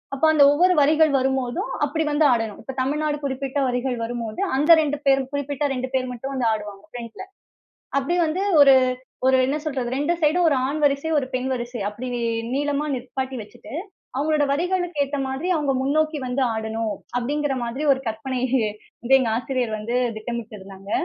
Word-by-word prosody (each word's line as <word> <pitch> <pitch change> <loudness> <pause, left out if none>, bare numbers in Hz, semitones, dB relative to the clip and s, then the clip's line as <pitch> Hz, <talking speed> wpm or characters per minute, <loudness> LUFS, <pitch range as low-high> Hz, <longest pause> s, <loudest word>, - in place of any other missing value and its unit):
அப்போ 300 - +1
அந்த 290 -2 +6
ஒவ்வொரு 360 +5 +4
வரிகள் 310 +1 +4
வரும்போதும், 260 -1 -1
அப்பிடி 315 +2 -1
வந்து 300 +1 +3
ஆடணும். 225 -3 -2
இப்ப 265 - -7
தமிழ்நாடு 295 +2 0
குறிப்பிட்ட 270 +1 -2
வரிகள் 250 0 -1
வரும்போது, 230 - -4 0.2
அந்த 300 +4 +4
2 290 -1 -1
பேர் 270 0 +4
குறிப்பிட்ட 285 +1 -2
2 255 0 -3
பேர் 255 -1 -1
மட்டும் 265 +3 -6
வந்து 250 -3 0
ஆடுவாங்க 210 -2 -5
ஃபிரண்ட்‌ல. 235 +7 -8 0.8
அப்பிடி 325 +6 -1
வந்து 350 +5 -1 0.2
ஒரு, 275 -1 +8 0.5
ஒரு 260 0 +5
என்ன 280 +3 0
சொல்றது 260 -5 -2
2 315 +4 +1
சைடும், 335 +3 +3
ஒரு 280 - +2
ஆண் 305 +2 -2
வரிசை, 280 +3 +1
ஒரு 260 - -1
பெண் 255 +1 -1
வரிசை 240 -3 -5
அப்பிடி 245 +5 -6 0.5
நீளமா 290 +1 0
நிப்பாட்டி 260 +1 -4
வச்சுட்டு, 210 - -12 0.4
அவுங்களோட 300 0 +2
வரிகளுக்கு 355 +1 -1
ஏத்த 285 +1 -4
மாதிரி 270 +7 -3
அவுங்க 290 -3 +1
முன்னோக்கி 310 +2 +1
வந்து 255 +2 -1
ஆடணும், 220 0 -2 0.2
அப்பிடிங்கிறமாதிரி 265 0 -2
ஒரு 265 - -1
கற்பனை 250 +3 -3 0.6
வந்து 260 +3 +5
எங்க 240 -4 0
ஆசிரியர் 245 -3 -2
வந்து 230 +4 -2 0.2
திட்டமிட்டு 225 0 -5
இருந்தாங்க. 195 +1 -12
265 Hz, 165 wpm, -23 LUFS, 245-295 Hz, 0.8 s, ஒரு